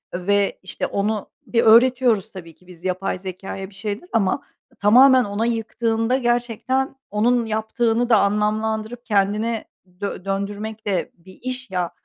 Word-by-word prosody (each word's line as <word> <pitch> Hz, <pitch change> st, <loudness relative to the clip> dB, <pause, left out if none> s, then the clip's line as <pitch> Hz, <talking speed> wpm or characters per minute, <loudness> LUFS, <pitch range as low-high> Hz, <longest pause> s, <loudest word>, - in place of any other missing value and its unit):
ve, 200 Hz, +2 st, +1 dB
işte, 190 Hz, -, -3 dB
onu 210 Hz, +1 st, -2 dB, 0.2 s
bir 230 Hz, -1 st, +2 dB
öğretiyoruz 240 Hz, -2 st, +4 dB
tabii 170 Hz, -4 st, -10 dB
ki 180 Hz, -, -26 dB
biz 175 Hz, -2 st, -15 dB
yapay 185 Hz, 0 st, -2 dB
zekâya 190 Hz, +1 st, -7 dB
bir 200 Hz, -, -18 dB
şeyler 210 Hz, -, -5 dB
ama 220 Hz, +4 st, +1 dB, 0.4 s
tamamen 255 Hz, +5 st, +7 dB
ona 205 Hz, +2 st, -2 dB
yıktığında 225 Hz, +1 st, 0 dB
gerçekten 245 Hz, +2 st, 0 dB, 0.2 s
onun 235 Hz, +3 st, +2 dB
yaptığını 225 Hz, +2 st, 0 dB
da 225 Hz, -, +6 dB
anlamlandırıp 215 Hz, +3 st, -1 dB
kendine 215 Hz, +2 st, 0 dB, 0.4 s
dö 200 Hz, -2 st, -4 dB
döndürmek 205 Hz, +3 st, -4 dB
de 190 Hz, -4 st, -1 dB
bir 185 Hz, +2 st, -17 dB
iş, 255 Hz, -1 st, -5 dB
ya. 180 Hz, -2 st, -1 dB
215 Hz, 140 wpm, -22 LUFS, 195-235 Hz, 0.4 s, tamamen